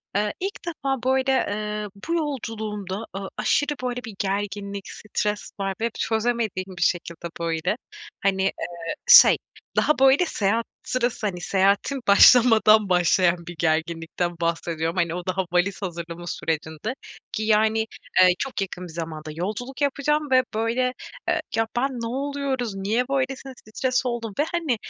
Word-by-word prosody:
eee, 210 0 +1
ilk 390 -1 -5
defa 275 -6 -2
böyle, 265 0 +2
ııı, 210 0 -3 0.2
bu 335 - 0
yolculuğumda 220 - -3
a 195 0 -5
aşırı 295 0 +1
böyle 250 0 -2
bir 220 -4 -8
gerginlik 200 0 -3
stres 210 0 -3
var 195 0 -1
ve 230 - +1
çözemediğim 220 -5 -1
bir - - -6
şekilde, 170 -1 -1
böyle, 165 +4 -1 0.5
hani, 190 -1 +2
eee, 195 - -2 0.4
şey - - +10 0.4
daha 300 - +3
böyle 270 +6 +5
seyahat 225 -4 0 0.2
sırası, 240 -3 -1
hani, 180 -3 -3
seyahatin 200 +9 +1
başlamadan 220 -1 +7
başlayan 175 -1 +3
bir 175 - -7
gerginlikten 165 +2 -1
bahsediyorum. 165 0 -1
Hani, 170 -2 +1
o 180 - -4
daha 185 +1 0
valiz 190 +3 +1
hazırlama 170 -1 -5
sürecinde, 160 +6 -3 0.4
ki 220 - -2
yani, 220 0 +3 0.4
eee, 180 -1 +6
çok 270 -5 -3
yakın 185 -2 -4
bir 170 - -10
zamanda 160 -2 -6
yolculuk 215 - -4
yapacağım 290 +1 +1
ve 255 0 +6
böyle, 230 +3 0 0.5
ııı - - +1 0.2
ya 225 0 +2
ben 265 +3 +2
ne 230 - -3
oluyoruz, 270 -3 -2
niye 215 +6 0
böylesine 270 0 -2 0.2
stres 255 -1 0
oldum 235 -3 -3
ve, - - +4
hani, 320 -9 0
210 Hz, 145 wpm, -24 LUFS, 180-255 Hz, 0.5 s, şey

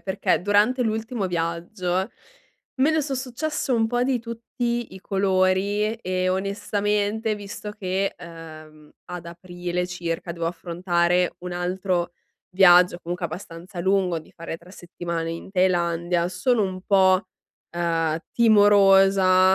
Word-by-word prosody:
perché 190 -2 0
durante 205 +6 +3
l'ultimo 220 -2 -2
viaggio 175 +3 -2 0.7
me 295 +4 +4
ne 315 -1 +1
son 275 -1 -3
successe 265 +4 -3
un 230 -3 +3
po' 245 +2 0
di 255 0 +1
tutti 235 0 -4
i 190 - -10
colori 195 +2 +1
e 185 -5 -2
onestamente, 205 +3 -1
visto 205 +1 -7
che, 195 -1 -2
ehm, 155 -2 -12 0.2
ad 180 -1 -7
aprile 175 +1 -4
circa 175 -1 -4
devo 170 -1 -3
affrontare 175 +1 0
un 180 0 -6
altro 180 0 -1 0.4
viaggio 180 -2 +6
comunque 175 +1 -3
abbastanza 170 +2 -9
lungo, 185 -1 +1
di 155 - -16
fare 165 0 -7
3 175 +2 -17
settimane 170 -2 -5
in 165 +3 -7
Thailandia, 175 -2 +1
sono 225 +5 +1
un 185 -1 -4
po', 190 -1 +3 0.5
uhm, 165 -2 0
timorosa 195 -4 +5
185 Hz, 125 wpm, -24 LUFS, 175-205 Hz, 0.7 s, viaggio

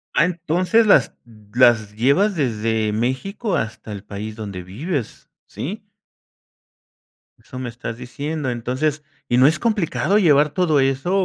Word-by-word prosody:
Ah, 155 - +5
entonces 180 +5 +1
las 205 - +5 0.4
las 115 -4 +4
llevas 140 - +2
desde 110 -6 0
México 130 - -2
hasta 110 -3 -4
el 100 -1 -7
país 105 +1 -7
donde 100 -4 -6
vives, 120 - -5 0.2
¿sí? - - -5 1.6
Eso 130 - -10
me 130 -1 -4
estás 115 -1 -7
diciendo. 145 +4 -4
Entonces, 130 +5 -2 0.2
¿y 120 - +1
no 130 +2 +7
es 160 - +2
complicado 210 -3 +1
llevar 150 -6 +4
todo 165 -6 +2
eso 135 +9 +1
135 Hz, 135 wpm, -21 LUFS, 115-170 Hz, 1.6 s, no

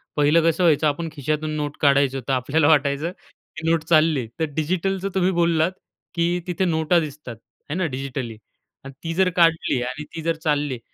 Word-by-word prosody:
पहिलं 150 +3 +4
कसं 165 +2 +2
व्हायचं 155 -2 +4
आपण 160 +3 -2
खिशातून 155 +1 -2
नोट 150 -1 -3
काढायचो, 140 -2 +3
तर 135 - +1
आपल्याला 140 +4 +2
वाटायचं 145 +2 +2 0.4
की 160 0 -5
नोट 165 -1 +2
चालली. 155 -5 +3
तर 160 - +2
डिजिटलचं 185 +4 -1
तुम्ही 190 0 +2
बोललात 170 -1 +2 0.4
की 170 +1 +1
तिथे 180 +2 0
नोटा 165 0 +2
दिसतात, 150 -6 -6 0.3
हे 150 - -2
ना 185 -1 0
डिजिटली? 130 -4 -5 0.5
अन् 135 - -7
ती 165 0 -3
जर 185 +2 +3
काढली 165 -6 +3
आणि 130 +5 -5
ती 165 - -4
जर 165 0 0
चालली. 145 -4 0
155 Hz, 175 wpm, -22 LUFS, 145-170 Hz, 0.5 s, पहिलं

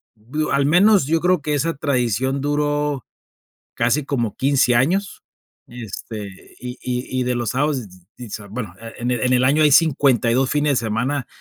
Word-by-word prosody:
digo, 130 +9 -4
al 140 0 +2
menos 190 +4 +5
yo 165 +3 +1
creo 180 -2 +2
que 150 +1 -2
esa 165 +4 0
tradición 130 -2 0
duró 145 -1 -1 0.7
casi 120 +5 +1
como 120 -6 -2
15 135 -2 +2
años, 185 +11 0 0.4
este, 110 -2 -7 0.3
y 125 +1 -7
y 125 +1 -3
y - - 0
de 125 0 0
los 120 -3 -2
sábados, 145 +2 0
s 120 - -7
s 90 -2 -18
y 125 - -8
s 105 -1 -8
bueno, 105 -4 -5
e 115 0 -10
en 120 - 0
en 125 +1 0
el 125 0 +3
año 145 +4 +3
hay 150 - +4
52 135 -5 +3
fines 150 0 +1
de 115 - -4
semana, 125 +5 -1
130 Hz, 185 wpm, -21 LUFS, 120-145 Hz, 0.7 s, menos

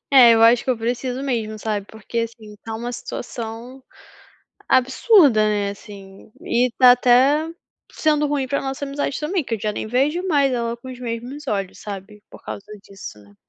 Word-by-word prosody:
é 240 -4 +8
eu 225 - +3
acho 235 +1 +5
que 260 - 0
eu 250 - +1
preciso 245 +3 -3
mesmo 225 -5 -3
sabe, 210 -2 -3
porque 220 +2 -7
assim, 225 -2 -7
tá 225 0 -5
uma 240 +2 -5
situação 240 +1 -7 0.9
absurda, 260 - +4
né, 205 -1 0
assim. 200 0 -13
E 245 +1 +1
tá 250 -1 +8
até 260 +6 +3 0.4
sendo 300 -1 +1
ruim 280 -3 -1
pra 280 - -1
nossa 270 +1 -4
amizade 280 0 -3
também, 320 +1 -1
que 230 - -3
eu - - -15
já 210 -1 -1
nem 215 - -5
vejo 280 +9 0
mais 280 -5 +2
ela 235 -1 -2
com 260 +2 -10
os 250 - -9
mesmos 245 +5 -6
olhos, 195 -3 -3
sabe, 205 +1 -9
por - - -14
causa 200 - -7 0.2
disso, 195 - -10
né. 100 0 -20
240 Hz, 180 wpm, -21 LUFS, 215-270 Hz, 0.9 s, é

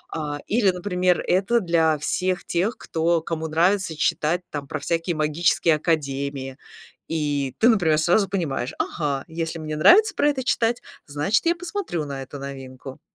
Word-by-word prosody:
А, 150 -2 -3
или, 215 -2 +2
например, 180 -1 +1
это 200 +6 +2
для 165 -4 +2
всех 185 +5 -1
тех, 190 +7 -1
кто 165 0 0
кому 160 -1 -4
нравится 170 +2 +1
читать 155 +3 +1
там 145 -2 -5
про - - -4
всякие 165 +2 -1
магические 155 +1 +2
академии, 140 -4 -2 0.5
и 145 -4 -2
ты, 230 - +5
например, 175 -9 +3
сразу 175 +5 +2
понимаешь: 145 -10 -2
"Ага, 145 -4 -2
если 165 0 -4
мне 155 -1 -4
нравится 400 - +6
про 295 - +3
это 265 -3 -2
читать, 235 -1 +1 0.3
значит 150 - 0
я 340 - +3
посмотрю 345 - -4
на 140 -2 -5
эту 140 +2 -9
новинку". 135 -1 -9
165 Hz, 155 wpm, -23 LUFS, 145-190 Hz, 0.5 s, нравится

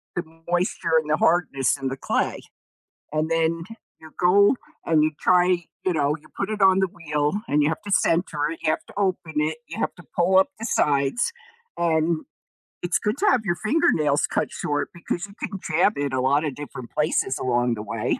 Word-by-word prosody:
the 175 - -1 0.3
moisture 175 -1 0
and 155 - -7
the 155 0 +2
hardness 145 -7 +2
in 135 -1 -2
the 135 - -3
clay, - - -1 0.7
and 155 +1 0
then, 165 0 0 0.4
you 160 - -13
go 200 +6 +5 0.3
and 160 -2 +3
you 155 - +3
try, 180 -1 +3 0.2
you 185 - +2
know 150 -2 +1
you 155 - -20
put 200 +1 -2
it 215 -1 -3
on 190 0 +6
the 190 - +3
wheel 150 +1 -2
and 150 +1 +3
you - - +3
have 160 - -3
to 205 - -7
center 165 -5 +1
it, 165 - -7
you 155 - +2
have - - -1
to - - -15
open 185 -5 -1
it, 155 +7 -1
you 225 - -7
have - - -1
to 175 - -14
pull 185 +2 +4
up 190 - +3
the 225 - -3
sides, 145 - +1 0.4
and, 165 -1 +1 0.6
it's 175 0 +1
good 210 0 -1
to 410 - +2
have 245 - +3
your 175 -3 +1
fingernails 215 - +2
cut - - -1
short 145 -1 -2
because 175 +2 -4
you 200 - -15
can 195 - -5
jab 175 +4 +1
it 140 -2 -1
a 130 - +1
lot 140 +4 +2
of 145 -4 -3
different 130 -4 -8
places 150 -3 0
along 120 -1 +1
the 105 - -6
way, 115 +2 -2
165 Hz, 210 wpm, -24 LUFS, 145-185 Hz, 0.7 s, on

